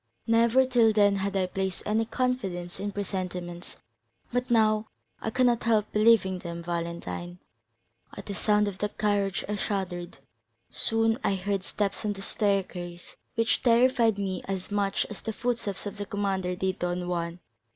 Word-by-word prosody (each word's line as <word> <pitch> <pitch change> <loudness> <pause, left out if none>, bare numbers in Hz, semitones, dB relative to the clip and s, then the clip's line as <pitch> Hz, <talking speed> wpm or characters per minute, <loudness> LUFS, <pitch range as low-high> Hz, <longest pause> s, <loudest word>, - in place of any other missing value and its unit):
Never, 230 +3 +4
till 235 -4 +4
then, 205 -1 +4
had 195 0 -1
I 190 -1 +2
placed 190 0 -3
any 220 +2 +1
confidence 195 -9 -2
in 205 +1 -2
presentiments, 180 -3 -5 0.6
but 245 +1 0
now 215 -2 +3 0.3
I - - -1
cannot 240 0 +3
help 220 -3 +2
believing 210 -4 +4
them, 170 -1 -6
Valentine. 170 +1 -4 0.8
At 200 - -7
the 200 - -4
sound 210 +1 +2
of 195 -1 -5
that 210 0 -3
carriage 205 -2 +1
I 210 0 -2
shuddered; 185 -4 -3 0.5
soon 225 +1 +2
I 195 - +2
heard 195 0 -1
steps 200 +1 -2
on 210 -1 0
the 195 -1 -8
staircase, 185 -5 -2 0.2
which 230 +1 +2
terrified 235 -2 +4
me 190 -2 -2
as 195 0 -4
much 200 -1 +1
as 210 - -8
the 220 - -4
footsteps 230 -5 -2
of 205 - -5
the 205 - -4
commander 195 -3 -1
did 190 0 -1
Don 175 0 -2
Juan. 170 -1 -2
200 Hz, 160 wpm, -28 LUFS, 185-220 Hz, 0.8 s, Never